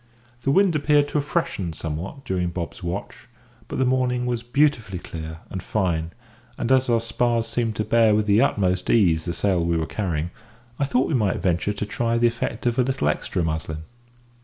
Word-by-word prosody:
The 135 - -1
wind 190 +3 +4
appeared 145 -1 +3
to 150 - +1
have 145 - -4
freshened 95 - -1
somewhat 85 - -5
during 90 -6 -1
Bob's 85 -1 -5
watch; 90 +3 -5 0.4
but - - -5
the 130 - +2
morning 125 -1 +1
was 120 -2 -1
beautifully 120 -5 +1
clear 80 -1 -7
and 95 - -4
fine; 85 -6 -1 0.5
and, 120 - -1
as 130 -1 +4
our 115 -1 +4
spars 115 0 0
seemed 115 -2 -1
to 110 - 0
bear 115 -2 +4
with 105 0 +2
the 105 +2 +4
utmost 90 -2 +1
ease 85 -8 +3
the 85 - -2
sail 95 -4 +1
we 85 0 +1
were 80 - 0
carrying, 85 +1 -2 0.5
I 140 - +2
thought 130 -1 +1
we - - -2
might 105 -7 +2
venture 90 +3 0
to 105 - -3
try 115 +2 0
the 120 - +3
effect 115 0 -1
of 120 +1 +1
a - - +5
little 125 - 0
extra 85 +3 -1
"muslin." 80 0 -3
105 Hz, 200 wpm, -24 LUFS, 85-125 Hz, 0.5 s, a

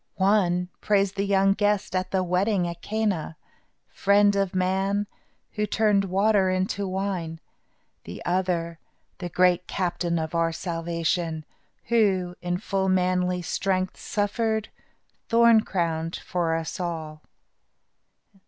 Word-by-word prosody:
One 185 -2 +2
praised 200 -2 +1
the 200 0 -1
young 195 0 +4
guest 205 -1 0
at 185 0 -1
the 190 -1 0
wedding 180 +1 +1
at 170 0 -7
Cana, 200 -7 -2 0.5
Friend 205 0 +3
of 195 -1 0
man, 190 +2 +1 0.5
who 210 -1 -2
turned 205 -2 +2
water 195 +1 +2
into 190 +2 -1
wine; 185 -4 -3 0.7
the - - -9
other, 175 -2 -1 0.4
"The 175 - -4
Great 180 +1 +2
Captain 175 -2 -1
of 160 0 -3
our 165 0 +1
Salvation," 165 -1 -2 0.4
who, 190 -6 +2
in 175 0 -1
full 190 0 -1
manly 180 -1 +1
strength, 185 +1 -1
suffered, 220 +1 -1 0.6
thorn 230 -1 +6
crowned, 165 -4 -2
for 170 -2 -1
us 165 +2 -4
all. 160 -3 -4
185 Hz, 120 wpm, -25 LUFS, 175-200 Hz, 0.7 s, thorn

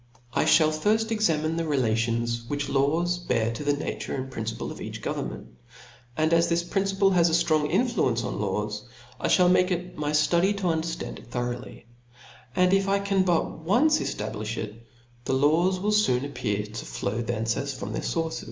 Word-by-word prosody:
I - - +2
fliall 155 -2 +5
firft 220 +8 +1
examinC/the 165 -5 0
relations 115 -3 0
which 145 +1 -2
kw$ 140 +4 +1 0.3
have 115 -1 +1
to 115 - -5
the 145 0 +2
nature 145 - -4
and 130 0 -5
principle 115 -2 -4
of - - -9
each - - -6
govern - - -3
ment - - -8
•, - - -17 0.7
and 160 +1 +2
as 165 0 +4
this 170 0 +1
principle 195 +2 +1
has 175 -2 +4
a - - -2
ftrong 155 -3 +2
influence 185 - +1
on 105 - -3
laws, 105 +1 -2 0.4
I - - -1
(hall 180 -1 +5
make 180 +1 +4
it 180 0 -3
my 150 -1 -1
ftudy 170 +6 +2
to 200 - -6
underftand 165 -1 -2
it - - -16
thoroughly; 120 0 -5 0.7
and 180 +1 +4
if 195 0 +3
I 195 0 +3
can 200 -1 +1
but 175 -3 0
once 250 - +3
eftablifh 110 +1 -4
if, 105 - -4 0.5
the - - 0
laws 160 +7 +3
will 210 +3 0
foon 140 -12 +2
appear 105 -7 -2
to 110 +2 -7
flow 80 - -3
from 120 - -2
thence 110 +2 0
as 140 0 -3
from 110 -5 -6
their - - -2
fource. 165 -1 -2
155 Hz, 190 wpm, -26 LUFS, 120-180 Hz, 0.7 s, fliall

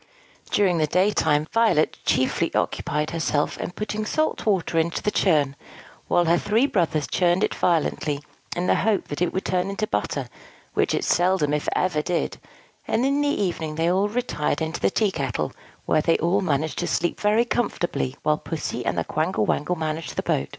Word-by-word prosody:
During 185 -5 +2
the 155 - +2
daytime, 160 -4 +2
Violet 220 -9 +2
chiefly 130 0 +1
occupied 150 +1 -1
herself 155 -3 0
in - - -3
putting 210 +3 -4
salt 310 +3 -1
water 180 -5 +2
into 165 +1 -1
a 210 - +2
churn; 150 -9 +2 0.5
while 175 - +3
her 170 +1 +3
three 220 +5 +2
brothers 170 - 0
churned 180 +2 +2
it - - +1
violently, 150 -3 0 0.3
in 175 - -1
the - - +4
hope 210 -1 0
that 145 - -5
it 175 - +2
would 190 - -3
turn 185 +1 0
into 200 +2 -2
butter, 105 - -2 0.5
which - - +1
it - - -1
seldom 175 -4 +2
if 150 - 0
ever 180 -5 +1
did; 175 +2 -2 0.5
and 240 - +1
in 280 +1 +2
the 290 - +1
evening 170 - -1
they 165 +2 +1
all 195 +3 +2
retired 210 -11 -1
into 160 +1 -3
the - - +2
tea 210 0 +1
kettle, 125 - -2 0.3
where 155 - +3
they 165 +1 +2
all 185 +4 +1
managed 155 -3 -1
to 175 - -1
sleep 175 - 0
very 215 +3 +3
comfortably, 175 - -1
while 150 0 +2
Pussy 165 - -4
and - - -1
the - - +1
Quangle 105 - 0
Wangle 180 +10 0
managed 160 -1 -4
the - - -2
boat. 70 - 0
175 Hz, 185 wpm, -24 LUFS, 155-200 Hz, 0.5 s, the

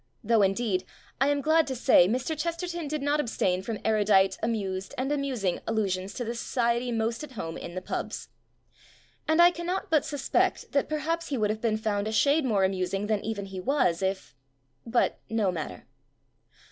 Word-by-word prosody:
Though, 225 0 +3
indeed, 195 -1 +1 0.4
I 270 - +3
am 285 0 +1
glad 315 +1 +3
to 265 - -3
say, 240 -7 +5
Mr. 255 - -1
Chesterton 335 +1 -3
did 300 -1 -3
not 290 +1 +1
abstain 190 -9 0
from 220 +2 -4
erudite, 205 -3 +4
amused, 195 -4 -2
and 265 +2 -1
amusing 260 -11 -1
allusions 195 -4 -1
to 245 - -3
the 230 - -2
society 235 +1 0
most 230 +3 -1
at 285 -3 -9
home 165 -7 -5
in 170 - -7
the 185 - -4
"pubs". - - -4 1.0
And 315 +1 +2
I 345 +1 +8
cannot 355 +3 -3
but 310 -2 +4
suspect 290 -2 0
that 280 - +1
perhaps 325 +2 -1
he 275 - -2
would 210 -2 +1
have 215 0 -5
been 220 -2 +1
found 210 -1 -1
a - - -2
shade 285 +7 +3
more 210 -6 +2
amus 190 0 -1
ing 195 +1 -2
than 210 -1 0
even 215 -2 -3
he 195 -1 -7
was 195 - +1
if.. 190 -9 -2 0.5
.but, 235 +1 +1
no 220 -4 +1
mat 160 -4 -4
ter. 90 - -11
225 Hz, 190 wpm, -27 LUFS, 195-285 Hz, 1.0 s, I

